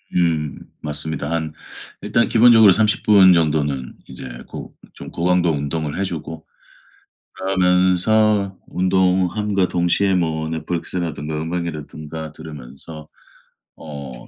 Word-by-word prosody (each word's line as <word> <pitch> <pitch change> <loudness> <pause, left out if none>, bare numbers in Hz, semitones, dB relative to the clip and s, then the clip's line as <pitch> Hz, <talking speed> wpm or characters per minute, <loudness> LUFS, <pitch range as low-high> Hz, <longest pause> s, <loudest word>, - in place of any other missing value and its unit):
음. 80 -4 0 0.2
맞습니다. 75 0 -4
한 80 -2 -2 0.5
일단 115 - +1
기본적으로 115 -3 +7
30 105 +2 +1
분 95 -3 +7
정도는 75 -5 0
이제 - - -9 0.2
고 - - -9 0.2
좀 - - -10
고강도 90 0 +1
운동을 75 +1 -3
해 - - +1
주고 80 -3 -6 0.9
그러면서 95 +2 +2
운동함과 95 +2 +1
동시에 90 +3 +1
뭐 80 -3 -1
넷플릭스라든가 80 -2 -4
음악이라든가 80 -2 -5
들으면서 75 0 -11 0.7
어 70 -6 -9
85 Hz, 250 characters per minute, -20 LUFS, 75-95 Hz, 0.9 s, 기본적으로